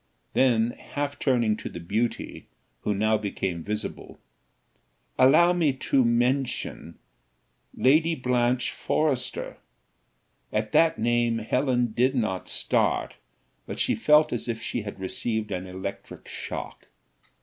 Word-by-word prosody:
Then 120 -3 +3
half 145 +2 -5
turning 120 -5 +2
to - - -6
the 85 - -8
beauty, 110 +7 -3 0.3
who 105 - -1
now 110 +2 +2
became 95 -4 -3
visible 105 +3 -5 1.0
"Allow 170 +7 +6
me 165 -6 +2
to 130 0 +1
mention 125 +3 0 0.8
Lady 160 +5 +3
Blanche 125 -1 +1
Forrester." 135 -5 -1 0.9
At 110 0 -1
that 165 0 +4
name 120 0 +1
Helen 120 +1 0
did 130 +3 +2
not 110 -7 -1
start, - - 0 0.5
but - - -6
she - - +2
felt 150 +6 +4
as 120 - -3
if 115 -1 -2
she 115 +1 -3
had 100 -2 -8
received 110 +2 -2
an 90 +1 -3
electric 95 +2 -7
shock. - - -7
120 Hz, 120 wpm, -26 LUFS, 110-130 Hz, 1.0 s, Allow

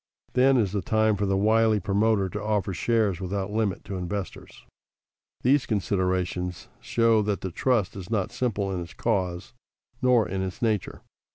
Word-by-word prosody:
Then 130 +1 +4
is 105 -6 +1
the 100 -1 -1
time 110 +3 +2
for 100 0 -1
the 95 0 +1
wily 110 +1 +3
promoter 100 0 +1
to 105 +3 -5
offer 105 -2 -1
shares 105 -1 +1
without 95 +2 -3
limit 105 -3 -1
to 95 - -5
investors. 90 0 -6 0.8
These 135 +2 +3
considerations 90 -3 -1
show 115 -2 +2
that 105 -1 -1
the 95 - -4
trust 115 0 0
is 95 -2 -8
not 105 -5 -1
simple 105 -6 -1
in 90 -2 -2
its 85 -2 -9
cause, 90 -6 -2 0.5
nor 125 -4 +4
in 95 +1 -3
its 95 +4 -4
nature. 110 -6 -1
100 Hz, 165 wpm, -26 LUFS, 95-110 Hz, 0.8 s, Then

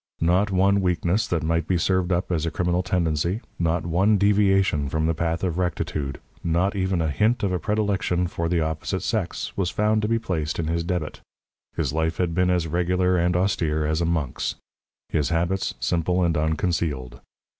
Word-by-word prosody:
Not 90 +5 +3
one 100 +1 +3
weakness 90 +4 +1
that 85 -3 -1
might 80 0 0
be 90 - +2
served 95 +1 +1
up 90 +1 0
as 85 -2 0
a - - +1
criminal 90 +1 0
tendency, 85 +1 0 0.2
not 85 0 0
one 95 +6 +3
deviation 95 -7 +3
from 80 +2 0
the 80 - +2
path 85 +1 -2
of 90 -1 -1
rectitude, 75 -6 -2 0.2
not 85 +5 +1
even 95 -3 0
a 80 - 0
hint 110 +9 +1
of 100 - +1
a 90 - 0
predilection 100 -4 0
for 85 -1 -2
the 85 -1 +1
opposite 80 +4 -2
sex, 105 -7 -2
was 95 -3 0
found 105 +2 +1
to 105 - 0
be 115 +1 +2
placed 80 -8 -2
in 85 - -1
his 85 +1 -1
debit. 85 -3 -3 0.5
His - - -1
life 80 0 0
had 90 -2 0
been 90 +2 +2
as 90 -2 +1
regular 90 +3 +1
and 90 0 +1
austere 80 -5 +1
as 80 +2 0
a - - +1
monk's; 80 -6 -1 0.5
his 75 -3 0
habits, 85 +3 0
simple 90 +2 +1
and 85 -1 +1
unconcealed. 75 -5 -1
85 Hz, 190 wpm, -24 LUFS, 80-95 Hz, 0.5 s, Not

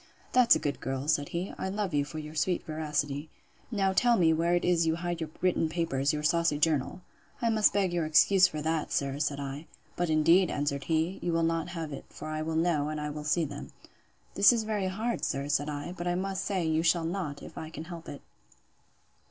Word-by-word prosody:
—That's 250 -2 +6
a - - +2
good 145 -1 -3
girl! 135 +2 -4
said 145 -2 +1
he; 175 +3 -4
I 190 - -2
love 200 -3 -2
you 145 -1 +2
for 150 +2 -8
your 155 0 -7
sweet 175 +3 0
veracity. 150 -1 -2 0.4
Now 195 -4 +1
tell 240 +4 +4
me 165 -3 +4
where 170 +2 +2
it 175 - 0
is 170 -2 +3
you 160 - +2
hide 175 0 -3
your 160 - -3
written 180 -3 +2
papers, 155 -5 0
your 150 0 -3
saucy 170 -1 +2
journal?—I 160 - -2
must 215 -1 +4
beg 190 -3 +1
your 170 -3 0
excuse 185 +4 +5
for 155 -4 -5
that, 160 -1 -1
sir, 140 0 -1
said 145 -1 -1
I. 140 +3 -6 0.3
But 175 -1 -1
indeed, 165 +4 +4
answered 145 -1 -2
he, 165 +3 0
you 175 - -1
will 165 0 +1
not 165 0 0
have 160 -3 -4
it: - - -8
for 155 - -8
I 155 0 -3
will 160 +1 -3
know, 160 -3 +1
and 155 0 -3
I 150 0 -3
will 150 0 -6
see 155 +3 +1
them.—This 200 - -1
is 230 -2 0
very 210 -3 -1
hard, 220 +6 -2
sir, 140 +1 -1
said 145 0 0
I; 145 +3 -5
but 175 -1 -5
I 175 - +1
must 190 +1 -2
say, 185 -4 -1
you 160 0 +1
shall 165 0 +2
not, 165 -5 -4
if - - -11
I 160 - -6
can 160 0 -7
help 170 0 -9
it. 140 - -8
160 Hz, 225 wpm, -29 LUFS, 150-180 Hz, 0.4 s, That's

